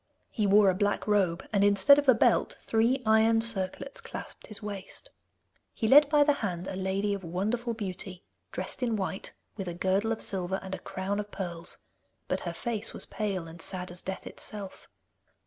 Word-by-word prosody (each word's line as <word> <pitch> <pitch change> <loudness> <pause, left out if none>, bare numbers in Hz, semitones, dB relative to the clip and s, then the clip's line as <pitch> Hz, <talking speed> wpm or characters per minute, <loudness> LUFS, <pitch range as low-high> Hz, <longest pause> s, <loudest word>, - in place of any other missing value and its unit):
He 215 -3 0
wore 200 0 +6
a - - -2
black 205 +2 0
robe, 190 -5 +1
and 200 -1 +3
instead 205 +8 +6
of 285 -2 +1
a 255 - +8
belt - - +2
three 230 +4 +2
iron 220 +1 +5
circlets 225 +4 -2
clasped - - -8
his 215 -1 -1
waist. 200 -2 -7 0.6
He 220 - 0
led 285 +4 +8
by 295 -1 +5
the 290 0 +4
hand 180 -4 -2
a - - -4
lady 195 +2 0
of 200 -1 -5
wonderful 215 +8 -2
beauty, 190 -3 -5 0.3
dressed - - -4
in 235 -3 +1
white, 195 -1 -4 0.2
with 195 -3 -4
a 175 - -4
girdle 190 +5 +1
of 225 - -1
silver 190 0 -2
and 190 - -6
a - - -3
crown 195 +2 -3
of 210 0 -4
pearls, 175 -4 -4 0.5
but - - 0
her - - -4
face 225 -2 -3
was - - -2
pale 195 -6 -3
and 165 0 -8
sad 180 0 -1
as 175 - -7
death 190 0 -5
itself. 200 -3 -6
200 Hz, 190 wpm, -29 LUFS, 190-225 Hz, 0.6 s, a